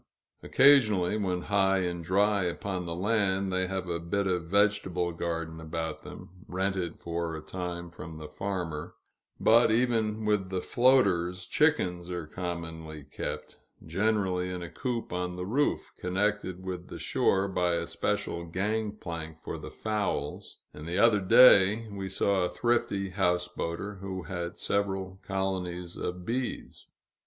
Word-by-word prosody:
Occasionally, 110 -10 +5
when 90 -4 -1
high 95 -1 +2
and 85 -1 -2
dry 100 +3 +2
upon 90 0 -3
the 85 - -3
land, 95 -1 +1
they 95 0 +1
have 95 -1 -3
a 85 -1 -2
bit 100 +4 -1
of 90 -3 0
vegetable 95 -2 +2
garden 85 -1 -4
about 80 0 -4
them, 90 +2 -12
rented 95 -2 -2
for 85 -1 -3
a - - -7
time 85 -2 -5
from 80 -1 -9
the 75 -1 -7
farmer; 85 -3 -4 0.4
but, 115 +2 +5
even 110 -2 +1
with 105 -3 +1
the 95 -1 -1
floaters, 95 -9 +3
chickens 90 - +1
are 90 -3 -4
commonly 80 -2 -6
kept, 75 - -6 0.3
generally 95 0 0
in 90 -1 -4
a 85 - -7
coop 120 -7 -3
on 90 0 -2
the 90 0 -4
roof, 135 +9 0
connected 95 -1 -1
with 90 -1 -5
the - - -8
shore 95 +1 +1
by 90 -2 +1
a 85 0 -1
special 85 0 -2
gang 105 +5 -1
plank 80 -5 -6
for 80 - -6
the - - -8
fowls; 105 -9 -3 0.2
and 75 +2 -9
the 85 +2 -1
other 115 -3 +5
day, 105 +1 +7
we 95 -1 -5
saw 95 0 +2
a 90 - +1
thrifty 100 -5 0
houseboater 90 +1 -1
who 95 -1 -5
had 85 -2 -5
several 95 -2 -2
colonies 90 -3 -3
of 90 0 -4
bees. 125 +3 -4
95 Hz, 145 wpm, -29 LUFS, 85-100 Hz, 0.4 s, day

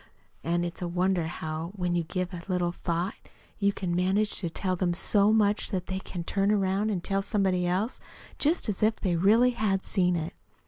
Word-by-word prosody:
And 175 +1 0
it's 175 +1 -5
wonderful 175 -1 0
how, 160 +2 -5
when 180 -3 -1
you 170 - +1
give 180 +2 -3
it 175 +1 -8
a - - -3
little 175 -1 +1
thought, 175 +2 -2 0.5
you 200 -1 +3
can 180 -3 -3
manage 195 +4 +1
to 175 - -2
tell 185 +3 -1
them 175 -1 0
so 200 +3 +3
much 210 -1 +2
that 185 -4 -2
they 190 0 -3
can 180 -2 -6
turn 195 +3 +1
about 200 0 +1
and 195 -5 -1
tell 195 0 0
somebody 190 -3 +1
else, 195 +8 -1 0.4
just 315 +1 +2
as 205 -3 -2
if 215 +1 +3
they 185 -5 -1
really 220 +8 +5
had 210 -5 0
seen 180 -3 +2
it." 165 0 -3
185 Hz, 200 wpm, -28 LUFS, 175-200 Hz, 0.5 s, really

